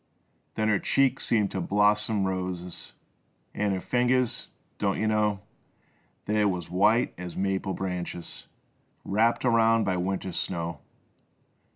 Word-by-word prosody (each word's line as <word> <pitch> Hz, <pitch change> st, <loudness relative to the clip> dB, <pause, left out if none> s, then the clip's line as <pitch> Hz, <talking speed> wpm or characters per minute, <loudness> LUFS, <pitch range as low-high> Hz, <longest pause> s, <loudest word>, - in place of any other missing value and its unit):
Then 110 Hz, -, 0 dB
her 105 Hz, -3 st, +3 dB
cheeks 135 Hz, -1 st, +2 dB
seemed 105 Hz, -4 st, +2 dB
bloomin' 105 Hz, +2 st, +2 dB
roses, 90 Hz, -1 st, -4 dB, 0.6 s
An' 105 Hz, -1 st, 0 dB
her 95 Hz, -, -1 dB
fingers 125 Hz, +3 st, +1 dB, 0.2 s
— -, -, -41 dB
don't 100 Hz, -2 st, +1 dB
yuh 110 Hz, -, 0 dB
know 105 Hz, -2 st, +1 dB, 0.4 s
— -, -, -39 dB
They 105 Hz, 0 st, +2 dB
was 90 Hz, -5 st, -1 dB
white 110 Hz, +7 st, +3 dB
as 90 Hz, -1 st, -6 dB
maple 95 Hz, 0 st, -1 dB
branches 90 Hz, -2 st, -4 dB, 0.6 s
Wrapped 115 Hz, +5 st, +2 dB
around 115 Hz, -1 st, +4 dB
by 95 Hz, -2 st, 0 dB
winter's 95 Hz, 0 st, -2 dB
snow. 85 Hz, -3 st, -3 dB
100 Hz, 130 wpm, -27 LUFS, 90-110 Hz, 0.6 s, around